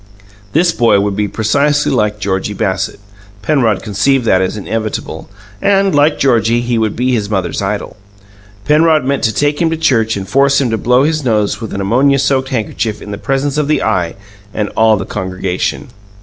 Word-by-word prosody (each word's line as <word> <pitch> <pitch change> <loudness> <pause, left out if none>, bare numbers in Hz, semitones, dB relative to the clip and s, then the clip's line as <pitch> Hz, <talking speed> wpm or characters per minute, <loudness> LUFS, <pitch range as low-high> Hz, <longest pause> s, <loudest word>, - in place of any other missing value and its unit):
This 170 +3 +3
boy 115 -8 +3
would 100 0 -1
be 105 0 0
precisely 145 +8 +1
like 105 -4 0
Georgie 100 0 -2
Bassett 95 0 -2 0.4
Penrod 115 -5 +1
conceived 115 +5 +1
that 95 -4 +3
as 95 +3 -2
inevitable 110 0 -4 0.3
and, 195 -2 +2
like 145 +1 +3
Georgie, 120 -3 +2
he 120 -1 -1
would 110 -2 -1
be 125 +2 0
his 105 -5 -1
mother's 95 -4 -2
idol. 100 +1 -3 0.7
Penrod 155 -1 +3
meant 140 +1 0
to 110 - +2
take 145 +5 0
him 165 - +2
to 165 - -2
church 115 -9 +1
and 95 -1 -6
force 140 +6 +3
him 130 -4 0
to 115 - 0
blow 125 +2 +3
his 155 0 0
nose 105 -3 0
with 110 - -6
an 100 - -3
ammonia 130 +8 +2
soaked 130 -1 0
handkerchief 110 -2 -2
in 105 - -9
the 105 - -6
presence 135 +4 -1
of 150 - 0
the 150 -2 +1
Eye 90 -6 -1 0.4
and 105 -1 -1
all 110 -1 +3
the - - -4
congregation. 95 -2 -3
115 Hz, 190 wpm, -14 LUFS, 105-140 Hz, 0.7 s, This